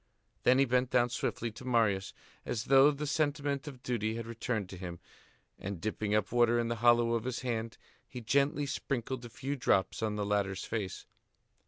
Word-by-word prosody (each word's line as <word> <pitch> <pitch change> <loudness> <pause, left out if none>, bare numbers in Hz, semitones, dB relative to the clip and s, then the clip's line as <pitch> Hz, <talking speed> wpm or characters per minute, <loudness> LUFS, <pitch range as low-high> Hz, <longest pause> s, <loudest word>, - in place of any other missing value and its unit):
Then 125 +1 +5
he 135 - +5
bent 125 0 +1
down 125 -1 +3
swiftly 120 -1 -2
to 120 +5 -11
Marius, 110 -6 +1 0.3
as 110 -2 -2
though 135 +2 +6
the 150 0 -3
sentiment 145 -1 -1
of 130 -3 -9
duty 115 -3 -1
had 115 -1 -4
returned 115 -3 -3
to 95 - -8
him, 90 -2 -7 0.6
and, 100 -2 -5
dipping 105 +1 -1
up 105 -2 0
water 120 0 +4
in 115 -1 0
the 115 - -2
hollow 120 -1 +5
of 115 -2 0
his 130 -2 -3
hand, 115 -2 -3 0.3
he 125 - -7
gently 140 +5 +1
sprinkled 130 -2 -3
a - - -8
few 135 +4 -4
drops 105 -8 +1
on 110 -1 -1
the 105 -1 -1
latter's 100 -2 0
face. 105 -5 -4
120 Hz, 190 wpm, -32 LUFS, 110-130 Hz, 0.6 s, though